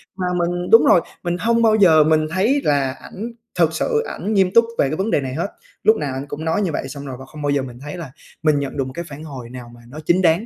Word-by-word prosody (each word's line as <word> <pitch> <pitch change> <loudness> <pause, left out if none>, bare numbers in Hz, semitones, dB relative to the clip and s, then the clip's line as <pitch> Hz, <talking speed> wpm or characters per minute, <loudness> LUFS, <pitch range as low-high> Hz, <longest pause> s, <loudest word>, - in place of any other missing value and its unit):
Mà 185 -1 -3
mình 175 +1 -1
đúng 225 - +7
rồi, 175 - +6 0.2
mình 175 0 -1
hông 230 +2 +2
bao 220 -2 +4
giờ 165 -7 +6
mình 155 0 +2
thấy 225 +11 +2
là 140 -3 +1
ảnh 225 +5 -7 0.3
thực 165 -2 +3
sự 455 - 0
ảnh 215 - -4
nghiêm 190 -3 +3
túc 230 0 +6
về 135 - +2
cái 155 - -2
vấn 200 +4 -1
đề 145 - +2
này 130 -1 -4
hết. 165 +7 -2 0.4
Lúc 220 - +5
nào 145 -8 -3
ảnh 135 +1 -4
cũng 145 +2 -6
nói 160 +5 +1
như 185 -5 0
vậy 140 - -3
xong 140 +1 -8
rồi 135 -2 -6
và 135 - -9
không 150 +2 -11
bao 145 - -1
giờ 140 -1 +2
mình 125 -2 -8
thấy 150 +4 -7
là 165 -7 -7 0.3
mình 155 -2 +3
nhận 140 0 -4
được 135 - +1
một 130 - -8
cái 170 +4 -5
phản 150 0 -9
hồi 130 -6 -8
nào 125 -1 -9
mà 120 - -16
nó 150 +5 -9
chính 175 +3 +3
đáng. 170 +4 +3
160 Hz, 295 wpm, -20 LUFS, 140-190 Hz, 0.4 s, đúng